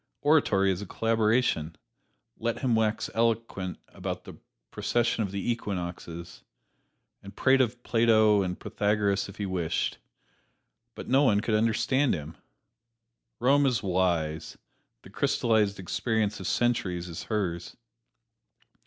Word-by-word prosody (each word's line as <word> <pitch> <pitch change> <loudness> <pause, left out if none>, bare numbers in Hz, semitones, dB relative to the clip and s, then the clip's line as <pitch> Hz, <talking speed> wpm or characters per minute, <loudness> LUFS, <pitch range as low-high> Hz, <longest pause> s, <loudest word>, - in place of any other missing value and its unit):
Oratory 105 -11 +3
is 95 +1 -3
a 100 - -7
collaboration 110 -8 +1 0.6
let 115 0 -3
him 125 -3 +1
wax 110 -1 +1
eloquent 115 -5 -1
about - - -5
the - - -10 0.4
precession 120 -1 0
of 100 - -1
the 100 +4 -2
equinoxes, 85 -6 -5 0.8
and 100 0 -12
prate 135 0 +4
of 120 0 -1
Plato 110 -3 +4
and 90 -2 -3
Pythagoras 105 -1 0
if 100 - -11
he 105 - -3
wished 90 -4 -2 1.0
no 135 +2 +2
one 105 -8 +4
could 110 +1 -1
understand 115 +5 +2
him! 75 0 -7 1.0
Rome 140 +3 +4
is 125 -4 0
wise 85 -5 -1 0.5
the - - -14
crystallized 110 -3 +1
experience 105 +2 -1
of 95 - -5
centuries 95 -8 0
is 85 -2 -7
hers. 90 -6 -3
105 Hz, 120 wpm, -28 LUFS, 95-115 Hz, 1.0 s, prate